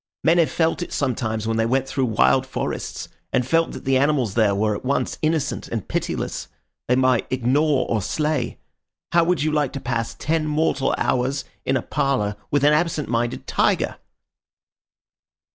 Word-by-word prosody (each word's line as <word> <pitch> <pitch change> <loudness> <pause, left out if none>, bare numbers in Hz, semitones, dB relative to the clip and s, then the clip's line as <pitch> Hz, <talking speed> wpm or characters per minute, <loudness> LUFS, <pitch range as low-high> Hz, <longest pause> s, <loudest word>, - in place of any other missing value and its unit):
Men 170 +2 +4
have 165 - +3
felt 165 +1 0
it 175 - -5
sometimes 110 -5 -1
when 115 0 0
they 115 - +2
went 135 +2 +1
through 135 -1 0
wild 130 +3 +3
forests, - - -4 0.2
and 125 - +1
felt 165 +5 +1
that - - -9
the 135 0 +3
animals 135 -7 +1
there 105 -3 +3
were 105 +1 +1
at - - -7
once 140 +2 -1
innocent 155 -2 -1
and - - -4
pitiless. - - -3 0.4
They 125 - +3
might 130 -2 +2
ignore 130 +2 +2
or 110 -2 0
slay. 150 +9 -1 0.5
How 170 0 +5
would 165 -3 +1
you 155 - +1
like 150 -3 0
to 140 - -4
pass 120 -3 -2
ten 155 0 -1
mortal 150 -3 +1
hours 130 +2 0 0.2
in 130 - +2
a 120 - -4
parlour 105 -7 0
with 145 -1 +1
an 150 +1 +6
absent 155 -1 0
minded 120 0 -1
tiger?" - - +1
135 Hz, 175 wpm, -22 LUFS, 120-155 Hz, 0.5 s, an